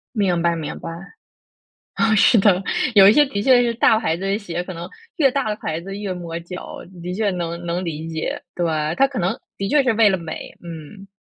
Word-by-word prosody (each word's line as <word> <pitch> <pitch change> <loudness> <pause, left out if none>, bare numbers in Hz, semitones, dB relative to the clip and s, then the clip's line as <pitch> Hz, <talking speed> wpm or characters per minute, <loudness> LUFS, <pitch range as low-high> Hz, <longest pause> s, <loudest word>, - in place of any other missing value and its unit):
明 185 -5 +1
白 170 0 +2
明 155 -2 -5
白。 165 - -6 1.1
哦， 220 -1 +3
是 215 - +5
的， 195 -2 +4 0.3
有 195 -2 +8
一 - - +8
些 295 +5 +5
的 200 -6 -3
确 250 -1 +5
是 240 -1 +1
大 225 -1 +4
牌 170 -8 -1
子 185 - -9
的 195 +2 0
鞋， 175 -4 -4
可 180 0 -8
能 170 +2 -7 0.3
越 275 -6 +4
大 270 -4 -1
的 210 - -2
牌 160 -3 -4
子 195 +3 -7
越 200 -2 -3
磨 170 -2 -5
脚， 180 +2 -8 0.2
的 180 +1 -4
确 210 0 0
能 170 -1 -4
能 175 +1 -2
理 160 0 -4
解， 160 -1 -4
对！ 175 -1 -1 0.3
它 275 - +5
可 270 - -5
能 185 +1 0 0.2
的 195 - -3
确 295 +5 +4
是 255 -3 +2
为 220 -1 +5
了 190 - 0
美， 165 -2 -7
嗯。 170 +4 -10
190 Hz, 240 characters per minute, -21 LUFS, 170-220 Hz, 1.1 s, 有